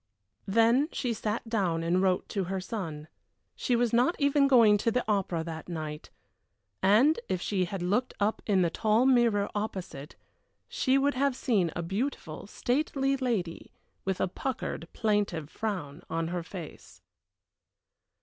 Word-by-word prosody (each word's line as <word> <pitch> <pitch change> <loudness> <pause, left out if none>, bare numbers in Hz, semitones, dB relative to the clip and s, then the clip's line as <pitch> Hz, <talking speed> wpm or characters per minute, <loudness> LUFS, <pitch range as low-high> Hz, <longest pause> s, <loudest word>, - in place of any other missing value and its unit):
Then 230 +8 +4
she 245 -3 -1
sat 220 +1 -3
down 185 -8 0
and 175 +2 +2
wrote 185 -1 +1
to 195 -3 -1
her 190 +2 -2
son 170 -7 -5 0.5
she 245 - 0
was 235 -1 +1
not 245 +8 +3
even 280 -1 +3
going 230 -6 +6
to 230 - +1
the 245 +2 0
opera 190 -6 0
that 160 0 -7
night. 155 -3 -5 0.7
And 235 - +5
if 185 - 0
she 185 0 0
had 180 0 -5
looked 210 +8 0
up 210 +2 0
in 195 -3 +3
the 170 - +1
tall 220 +6 +2
mirror 235 -6 +3
opposite, 190 -8 -5 0.5
she 260 0 +1
would 285 +1 +2
have 275 0 +1
seen 205 -10 +1
a 175 - -2
beautiful, 190 - -4
stately 275 +3 0
lady 230 -11 -3 0.3
with 190 -1 -2
a - - +1
puckered, 220 -4 -4
plaintive 205 -8 -1
frown 175 -9 -4
on 165 0 -1
her 175 0 -2
face. 165 -1 -10
205 Hz, 150 wpm, -29 LUFS, 175-245 Hz, 0.7 s, going